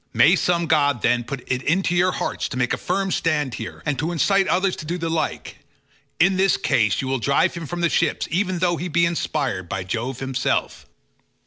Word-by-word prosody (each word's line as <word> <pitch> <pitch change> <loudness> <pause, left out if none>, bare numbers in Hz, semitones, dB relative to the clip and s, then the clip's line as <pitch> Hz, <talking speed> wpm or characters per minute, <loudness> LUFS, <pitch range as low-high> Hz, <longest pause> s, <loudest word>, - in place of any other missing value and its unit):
May - - +5
some 170 -1 +1
god, 145 -6 +2
then, 120 0 +2
put 125 +1 -6
it 130 -1 -1
into 175 +4 +1
your 180 +1 +3
hearts - - -3
to 130 - -5
make 125 -1 0
a - - 0
firm 195 +1 -1
stand 150 -7 0
here, 110 - -7
and 145 -4 -1
to 160 +3 -1
incite 195 +3 +2
others 185 +1 +1
to - - -7
do 175 +2 -2
the 165 -2 -3
like. 165 - -3 0.6
In 185 +3 +4
this 190 -7 +3
case 110 -3 +1
you - - -3
will 135 0 -1
drive 140 +4 +2
him 170 -2 -6
from 175 +2 -4
the 170 - +3
ships 165 -1 0
even 185 +2 0
though 175 -1 +1
he 175 - -4
be 170 0 +2
inspired 95 - -2
by 95 0 -3
Jove 115 +7 -4
himself." 135 -1 -2
160 Hz, 215 wpm, -22 LUFS, 130-175 Hz, 0.6 s, May